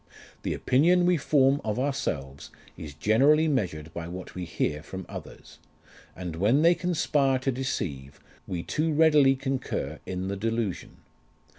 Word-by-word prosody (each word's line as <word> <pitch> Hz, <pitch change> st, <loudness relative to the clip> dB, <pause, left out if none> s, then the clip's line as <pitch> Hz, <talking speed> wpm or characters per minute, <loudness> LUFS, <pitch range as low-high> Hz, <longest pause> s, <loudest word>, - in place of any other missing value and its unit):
The -, -, -2 dB
opinion 175 Hz, +7 st, +3 dB
we 180 Hz, -1 st, +3 dB
form 140 Hz, -1 st, +3 dB
of 110 Hz, 0 st, -2 dB
ourselves 70 Hz, -, -3 dB, 0.3 s
is 75 Hz, -2 st, -9 dB
generally 135 Hz, -, +4 dB
measured 80 Hz, -, -2 dB
by 85 Hz, 0 st, -5 dB
what 90 Hz, +1 st, -8 dB
we 90 Hz, -1 st, -5 dB
hear 75 Hz, -3 st, -2 dB
from 95 Hz, +3 st, -8 dB
others; -, -, -11 dB, 0.6 s
and 90 Hz, -3 st, -6 dB
when 115 Hz, -, +3 dB
they 170 Hz, +1 st, +6 dB
conspire 150 Hz, -6 st, +1 dB
to 135 Hz, +1 st, -1 dB
deceive, 75 Hz, -, -4 dB, 0.3 s
we 85 Hz, -2 st, -4 dB
too 155 Hz, +1 st, -1 dB
readily 150 Hz, -3 st, +5 dB
concur 130 Hz, -, -3 dB
in 95 Hz, 0 st, -3 dB
the 100 Hz, +1 st, -3 dB
delusion. 115 Hz, -2 st, -3 dB
120 Hz, 145 wpm, -27 LUFS, 85-145 Hz, 0.6 s, they